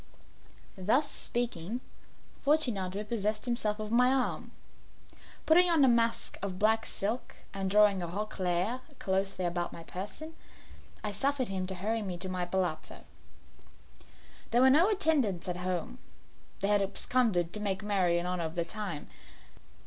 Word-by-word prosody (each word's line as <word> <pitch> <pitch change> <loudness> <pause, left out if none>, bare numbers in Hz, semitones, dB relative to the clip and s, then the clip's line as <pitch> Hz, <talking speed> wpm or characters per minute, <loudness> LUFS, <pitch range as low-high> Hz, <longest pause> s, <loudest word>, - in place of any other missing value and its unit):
Thus 255 +11 +2
speaking, 235 -2 -2 0.6
Fortunato 210 -10 +1
possessed 215 0 -1
himself 220 -4 -1
of 215 0 -4
my 250 +2 +5
arm. 265 -2 -1 0.9
Putting 345 +3 +6
on 320 -5 +6
a - - +4
mask 230 -1 +1
of 190 -2 -3
black 220 +2 +2
silk, 220 +5 -3 0.2
and 195 -1 -2
drawing 205 -1 +5
a 175 - -3
roquelaire 195 +3 -1 0.2
closely 190 -1 -1
about 175 0 -1
my 165 - -9
person, 210 - -7 0.7
I 210 - -1
suffered 265 +4 0
him 185 -1 -2
to 190 - -3
hurry 220 +5 -1
me 185 -4 -4
to 185 +2 -4
my 180 -1 -2
palazzo. 180 -3 -2 1.5
There 240 - +3
were 265 - +7
no 330 +9 +5
attendants 295 - +1
at 180 -1 -2
home; 180 +7 -3 0.6
they 200 - +2
had 205 -1 +4
absconded 195 -3 0
to 210 - -2
make 200 -1 -2
merry 190 -4 +2
in 175 - -2
honour 180 -2 -2
of 160 +1 -5
the 170 -1 0
time. 190 -4 -5
205 Hz, 150 wpm, -30 LUFS, 185-240 Hz, 1.5 s, were